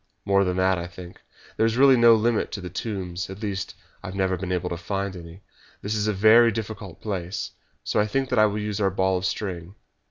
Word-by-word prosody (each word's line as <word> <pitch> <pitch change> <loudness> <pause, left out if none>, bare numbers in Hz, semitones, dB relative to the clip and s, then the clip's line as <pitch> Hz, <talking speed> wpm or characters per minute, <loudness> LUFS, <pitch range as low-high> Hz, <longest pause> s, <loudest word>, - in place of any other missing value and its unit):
"More 100 0 +3
than 90 -1 -1
that, 95 -1 +2
I 85 - -5
think. 90 0 -12 0.4
There 110 - +3
is 115 +1 -1
really 135 0 +7
no 120 -1 +7
limit 110 0 0
to - - -3
the 90 -2 -7
tombs 95 -3 -4
at 95 +3 -9
least, 100 -3 -4 0.3
I 100 - -8
have 95 - -7
never 95 -1 +1
been 90 0 -5
able 90 0 -2
to - - -1
find 95 +2 -3
any. 85 +2 -11 0.4
This 100 - -2
is 105 -1 0
a - - +2
very 110 +4 +6
difficult 105 -4 -6
place, 95 -3 -4 0.3
so - - 0
I 105 - +2
think 135 +4 -1
that 125 - +1
I 110 - +6
will 105 0 -3
use 105 -1 -3
our 100 - +3
ball 95 0 +1
of 95 - -1
string." 90 -3 -5
100 Hz, 240 wpm, -24 LUFS, 90-110 Hz, 0.4 s, really